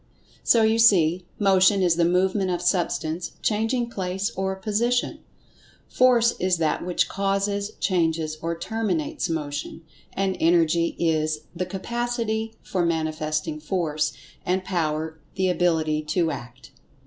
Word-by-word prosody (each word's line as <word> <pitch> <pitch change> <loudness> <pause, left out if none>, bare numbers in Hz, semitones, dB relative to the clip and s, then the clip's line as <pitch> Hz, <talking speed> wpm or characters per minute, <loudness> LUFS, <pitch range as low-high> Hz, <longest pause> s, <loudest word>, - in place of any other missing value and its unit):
So 230 -2 +4
you 220 +1 +3
see, 180 -5 +4
Motion 195 -1 +4
is 175 -2 +3
the 170 0 +2
movement 185 +2 +1
of 175 -1 -1
Substance 175 -2 -1
changing 235 +3 0
place 190 0 -2
or 190 0 -2
position; 225 +5 0 0.7
Force 240 -2 +4
is 185 -1 +1
that 160 -2 0
which 180 0 0
causes, 200 +1 -1
changes 160 -4 0
or 165 0 -2
terminates 185 -6 -2
Motion; 150 0 -4 0.3
and 195 -1 0
Energy 170 0 +2
is 155 -2 0
the 180 +1 -2
"capacity" 225 +2 -3
for 185 -2 -1
manifesting 155 -2 -1
Force; 155 -2 -1 0.3
and 185 +1 0
Power 160 -2 -2 0.2
the 190 -1 +1
Ability 160 -4 +1
to 165 +1 +1
Act. 125 +2 -9
180 Hz, 125 wpm, -24 LUFS, 160-200 Hz, 0.7 s, So